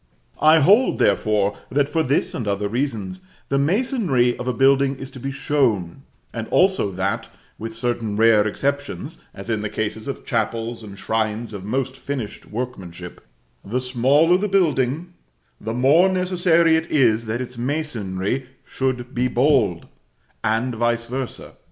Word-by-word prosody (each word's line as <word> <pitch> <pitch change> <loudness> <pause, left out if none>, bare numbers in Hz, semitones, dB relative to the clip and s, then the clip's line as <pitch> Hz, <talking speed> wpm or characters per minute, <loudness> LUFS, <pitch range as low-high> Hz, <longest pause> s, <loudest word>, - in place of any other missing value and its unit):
I 155 +1 +6
hold, 210 - +4
therefore, 105 -1 +2
that, 140 +3 +1
for 160 +2 0
this 140 -1 0
and 115 - -4
other 100 0 0
reasons, 105 -6 -3 0.3
the 140 - +2
masonry 165 - +1
of 125 - -5
a - - +2
building 135 +2 +3
is 135 0 -9
to 135 - -10
be 135 - -4
shown: 130 - 0 0.3
and 115 -1 -4
also 190 - +2
that, 100 +5 -2 0.3
with 115 0 -6
certain 115 -3 -2
rare 110 -1 +5
exceptions 140 +6 -3
(as 100 - -10
in 110 -2 -1
the 105 - -3
cases 110 +2 -4
of 140 - -5
chapels 115 0 -2
and 100 -2 -10
shrines 110 +1 -2
of 100 -2 -7
most 130 +5 -2
finished 135 -5 -6
workmanship), 95 -7 -6 0.4
the 115 +6 -2
smaller 135 +8 +3
the 210 - 0
building, 165 -3 +1 0.5
the 110 +2 -4
more 145 +9 +5
necessary 175 -3 +3
it 160 +1 -1
is 115 -6 +3
that 110 +2 -2
its 125 -1 -6
masonry 125 -5 -2 0.2
should 130 -1 -3
be 125 0 +1
bold, 125 - +2 0.6
and 115 +3 0
vice 120 0 0
versâ. 130 +1 -5
125 Hz, 150 wpm, -22 LUFS, 110-145 Hz, 0.6 s, I